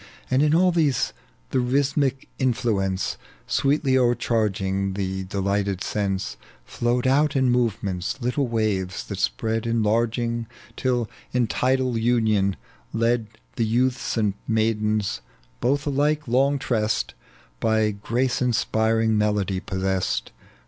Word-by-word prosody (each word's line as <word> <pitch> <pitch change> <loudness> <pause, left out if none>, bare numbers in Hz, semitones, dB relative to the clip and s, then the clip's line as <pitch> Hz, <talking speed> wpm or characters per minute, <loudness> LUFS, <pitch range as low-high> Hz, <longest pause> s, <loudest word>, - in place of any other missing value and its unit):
And 130 +2 +4
in 150 +1 +4
all 180 +2 +4
these 155 -6 +1 0.4
the - - +2
rhythmic 135 +1 +1
influence, 105 -7 0 0.3
Sweetly 140 -1 +2
o'ereharging 105 -6 0
the 95 -1 -2
delighted 100 0 -1
sense, 100 -2 -2 0.3
Flowed 120 - -1
out 145 +3 +3
in 130 -2 +3
movements, 105 -6 -1
little 125 +2 0
waves 105 -6 -1
that - - -6
spread 110 - -1
Enlarging, 115 +1 0 0.3
till 125 -3 0 0.3
in 125 -1 +3
tidal 125 0 +1
union 110 -5 +2 0.4
led 115 0 +1 0.3
The 115 - +2
youths 125 +2 0
and 105 -3 +2
maidens 110 - 0 0.4
both 140 +3 +1
alLlie 145 +1 +2
long 135 +4 +2
tressed, 110 -5 -1 0.5
By 110 - +2
grace 120 +6 -1
inspiring 110 -2 +2
melody 105 -3 +1
possessed. 95 - -1
115 Hz, 115 wpm, -24 LUFS, 105-130 Hz, 0.5 s, And